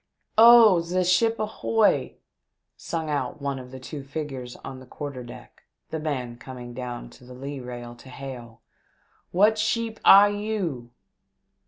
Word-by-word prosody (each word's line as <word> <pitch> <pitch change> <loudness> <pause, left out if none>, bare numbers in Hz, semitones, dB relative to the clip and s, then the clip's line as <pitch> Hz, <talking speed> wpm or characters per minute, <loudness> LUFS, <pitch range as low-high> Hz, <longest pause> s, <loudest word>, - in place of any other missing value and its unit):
" - - -51
Oh, 225 -6 +8
ze 180 +2 -1
sheep 225 +6 +2
ahoy 215 0 +1 0.3
!" - - -56 0.2
sung 165 -2 -4
out 145 -2 -2
one 140 -1 -3
of 125 -1 -10
the 130 +1 -9
two 140 +2 -8
figures 135 -4 -6
on 130 -1 -7
the 130 - -14
quarter 140 -1 -7
deck, 120 - -13 0.3
the 160 - -3
man 130 -6 -4
coming 125 -2 -9
down 120 - -7
to - - -17
the 125 0 -12
lee 140 +2 -6
rail 120 -1 -8
to 130 - -14
hail, 125 -4 -9 0.3
" - - -41 0.3
What 210 +4 +3
sheep 225 +1 -1
air 200 +1 +9
you 205 - -3
140 Hz, 165 wpm, -25 LUFS, 125-200 Hz, 0.3 s, air